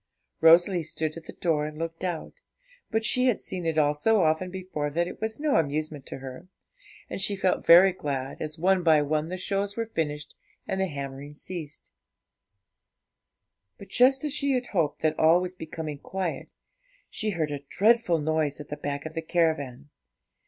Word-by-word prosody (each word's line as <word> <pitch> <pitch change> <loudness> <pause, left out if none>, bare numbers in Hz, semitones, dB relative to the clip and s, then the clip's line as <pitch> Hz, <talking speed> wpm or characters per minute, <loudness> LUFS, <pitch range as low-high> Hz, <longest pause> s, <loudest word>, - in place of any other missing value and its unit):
Rosalie 170 +3 +6
stood 155 0 -3
at 165 -1 -10
the - - -8
door 155 -4 0
and 150 0 -9
looked 165 +2 -5
out; 175 -4 -3 0.6
but 220 0 0
she 255 +3 +3
had 245 - +2
seen 180 -3 -4
it 160 -1 -1
all 145 -1 +4
so 210 +6 +2
often 160 +3 +1
before 180 -5 -4
that 170 +4 0
it 180 - -9
was 220 +2 -3
no 300 -1 +2
amusement 150 -2 -2
to - - -6
her, 135 +6 -9 0.6
and - - -4
she 200 +1 +4
felt 190 -1 0
very 180 +3 +8
glad, 140 -5 -4
as, 155 +1 -4
one 185 +3 +3
by 160 -3 +4
one, 155 +2 -1
the 185 - -4
shows 200 +2 -2
were 230 - -1
finished 150 -2 -3 0.3
and 190 - -1
the 190 - +1
hammering 140 -1 -7
ceased. 155 -2 -8 1.9
But, 200 - -12
just 265 +2 +4
as 300 -2 -2
she 280 -3 +1
hoped 160 -7 0
that 155 0 +1
all 160 +2 +6
was 180 0 -4
becoming 160 -4 -6
quiet, 185 +1 -4 0.6
she 215 - -2
heard 160 -6 -1
a 145 - -3
dreadful 200 - +2
noise 155 -1 -1
at 150 - -9
the 150 - -5
back 140 0 -4
of 160 - -6
the 165 - -3
caravan. 150 -5 -1
165 Hz, 180 wpm, -27 LUFS, 150-190 Hz, 1.9 s, very